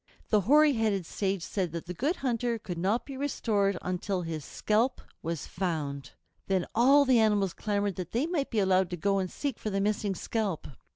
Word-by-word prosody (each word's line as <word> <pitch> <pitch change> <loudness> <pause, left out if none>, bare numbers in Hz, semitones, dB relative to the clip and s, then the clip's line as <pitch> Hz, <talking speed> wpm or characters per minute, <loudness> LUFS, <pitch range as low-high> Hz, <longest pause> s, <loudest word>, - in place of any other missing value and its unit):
The 210 -2 +4
hoary 295 +8 +5
headed 215 -6 0
sage 195 0 -2
said 185 -2 -2
that 170 - -5
the 180 - -5
Good 285 - 0
Hunter 240 -4 -1
could 175 -5 -6
not 200 +7 +1
be 275 - -7
restored 210 -8 0
until 185 +1 -2
his 160 -2 -4
scalp 220 - 0 0.2
was 165 -2 -3
found. 155 -7 -3 0.3
Then 190 -2 +1
all 275 +5 +6
the 255 -3 +5
animals 205 -4 +2
clamored 205 -2 -1
that 180 -2 -5
they 245 +6 +1
might 320 -5 -1
be 230 - -3
allowed 190 -2 +3
to 175 - -4
go 195 +3 +1
and 185 -1 -2
seek 280 +2 -4
for 215 - -3
the 195 -1 -1
missing 205 -1 0
scalp. 205 -4 -2
200 Hz, 195 wpm, -29 LUFS, 180-235 Hz, 0.3 s, all